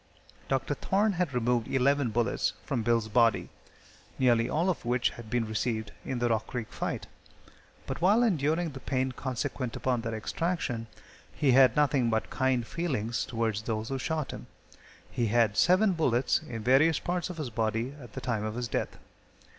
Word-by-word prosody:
Dr. 135 Hz, +2 st, 0 dB
Thorne 200 Hz, +8 st, +1 dB
had 180 Hz, -4 st, -1 dB
removed 120 Hz, -2 st, 0 dB
eleven 135 Hz, 0 st, +2 dB
bullets 115 Hz, +2 st, 0 dB
from 130 Hz, -5 st, -1 dB
Bill's 115 Hz, -1 st, +1 dB
body, 115 Hz, +1 st, +3 dB, 0.7 s
nearly 120 Hz, -2 st, +3 dB
all 165 Hz, +4 st, +1 dB
of 185 Hz, -, -1 dB
which 120 Hz, 0 st, +1 dB
had 115 Hz, -2 st, -11 dB
been 120 Hz, -1 st, 0 dB
received 110 Hz, -1 st, -2 dB
in 130 Hz, -, -3 dB
the 120 Hz, 0 st, +1 dB
Rock 110 Hz, -2 st, 0 dB
Creek 120 Hz, -3 st, -5 dB
fight, -, -, -3 dB, 0.8 s
but -, -, -5 dB
while 205 Hz, +7 st, +5 dB
enduring 165 Hz, -, +1 dB
the 135 Hz, -, -8 dB
pain 130 Hz, 0 st, -1 dB
consequent 130 Hz, -1 st, -3 dB
upon 125 Hz, -2 st, 0 dB
their 115 Hz, -1 st, -3 dB
extraction, 120 Hz, -1 st, -2 dB, 0.4 s
he 140 Hz, -3 st, +2 dB
had 130 Hz, -2 st, +6 dB
nothing 140 Hz, -5 st, +3 dB
but 110 Hz, -1 st, -1 dB
kind 130 Hz, -3 st, +1 dB
feelings 120 Hz, -8 st, -2 dB
towards 110 Hz, -3 st, -1 dB
those 110 Hz, 0 st, -3 dB
who 135 Hz, -1 st, -2 dB
shot 155 Hz, 0 st, -2 dB
him. -, -, -9 dB, 0.6 s
He 120 Hz, -, 0 dB
had 110 Hz, -1 st, +2 dB
seven 185 Hz, -, +4 dB
bullets 130 Hz, -6 st, +1 dB
in 115 Hz, -3 st, -5 dB
various 140 Hz, +6 st, +4 dB
parts 175 Hz, +1 st, -2 dB
of 180 Hz, -, -7 dB
his 145 Hz, -6 st, -4 dB
body 115 Hz, +3 st, -1 dB
at 120 Hz, -4 st, -12 dB
the -, -, -6 dB
time 115 Hz, -4 st, -1 dB
of 110 Hz, 0 st, -3 dB
his 120 Hz, 0 st, -2 dB
death. -, -, -3 dB
125 Hz, 175 wpm, -29 LUFS, 115-145 Hz, 0.8 s, had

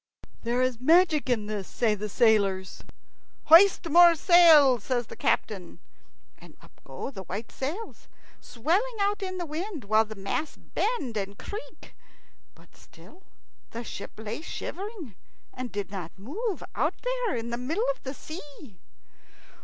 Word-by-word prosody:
"There 240 Hz, +2 st, 0 dB
is 255 Hz, -3 st, -1 dB
magic 320 Hz, -1 st, +4 dB
in 225 Hz, -4 st, +1 dB
this," 210 Hz, -2 st, -4 dB
say 230 Hz, -3 st, +1 dB
the 210 Hz, +1 st, -4 dB
sailors. 200 Hz, -5 st, +1 dB, 0.6 s
"Hoist 345 Hz, +2 st, +6 dB
more 340 Hz, +1 st, +7 dB
sail," 315 Hz, -7 st, +6 dB
says 240 Hz, +3 st, -2 dB
the -, -, -11 dB
captain; 190 Hz, -5 st, -1 dB, 0.6 s
and -, -, -16 dB
up -, -, -21 dB
go -, -, -7 dB
the 195 Hz, -, -8 dB
white 215 Hz, +7 st, -6 dB
sails, 335 Hz, +12 st, -6 dB, 0.3 s
swelling 360 Hz, -, -1 dB
out 405 Hz, +1 st, 0 dB
in 370 Hz, -1 st, -4 dB
the 350 Hz, -, -3 dB
wind, 325 Hz, -, -5 dB
while 215 Hz, +2 st, +3 dB
the 220 Hz, 0 st, -9 dB
masts 200 Hz, +10 st, -4 dB
bend 295 Hz, -, -2 dB
and 200 Hz, 0 st, -4 dB
creak. 425 Hz, +4 st, -9 dB, 0.6 s
But -, -, -22 dB
still 370 Hz, -, -18 dB, 0.5 s
the 235 Hz, +1 st, -6 dB
ship -, -, -8 dB
lay 220 Hz, +5 st, -5 dB
shivering 370 Hz, -, -7 dB, 0.4 s
and 255 Hz, -1 st, -6 dB
did 205 Hz, -1 st, -4 dB
not 180 Hz, -5 st, -7 dB
move, 365 Hz, -, -4 dB
out -, -, 0 dB
there -, -, -1 dB
in 235 Hz, 0 st, -4 dB
the 235 Hz, -, -2 dB
middle 315 Hz, -, -1 dB
of -, -, -29 dB
the 265 Hz, +1 st, -6 dB
sea. 295 Hz, -2 st, -10 dB
265 Hz, 150 wpm, -27 LUFS, 220-355 Hz, 0.6 s, more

